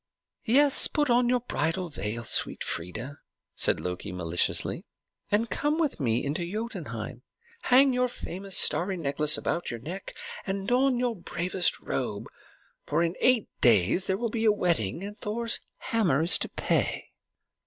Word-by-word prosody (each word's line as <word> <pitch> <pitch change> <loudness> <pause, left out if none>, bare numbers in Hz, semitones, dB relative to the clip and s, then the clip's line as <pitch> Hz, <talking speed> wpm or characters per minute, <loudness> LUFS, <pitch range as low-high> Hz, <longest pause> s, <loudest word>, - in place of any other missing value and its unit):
"Yes; 275 +4 +5
put 295 -4 0
on 240 0 +3
your 250 -1 +2
bridal 170 -5 -2
veil, 115 -6 -4
sweet - - 0
Freia," 110 +12 -5 0.3
said - - +2
Loki 90 +2 -5
maliciously, 90 -1 -1 0.5
"and 215 +3 +2
come 295 +2 0
with 315 - 0
me 120 -1 +1
to 170 +2 -4
Jotunheim. 225 +3 -5 0.4
Hang 260 +1 +5
your 250 0 +2
famous 195 -4 -3
starry 185 +2 +2
necklace 150 -1 +2
about 170 - -2
your 120 - -5
neck, 175 +11 -7 0.3
and 195 0 -3
don 255 +2 +3
your 245 -1 0
bravest 180 0 -1
robe; - - -3 0.6
for - - 0
in 170 0 0
eight 250 -4 +3
days 115 - +4
there 190 - 0
will 230 0 -2
be 225 -1 -2
a 215 - +6
wedding, 170 - 0
and 205 +1 -8
Thor's 230 +2 -2 0.2
hammer 180 -10 +1
is 170 - +5
to - - -2
pay." - - -1
190 Hz, 155 wpm, -27 LUFS, 145-235 Hz, 0.6 s, a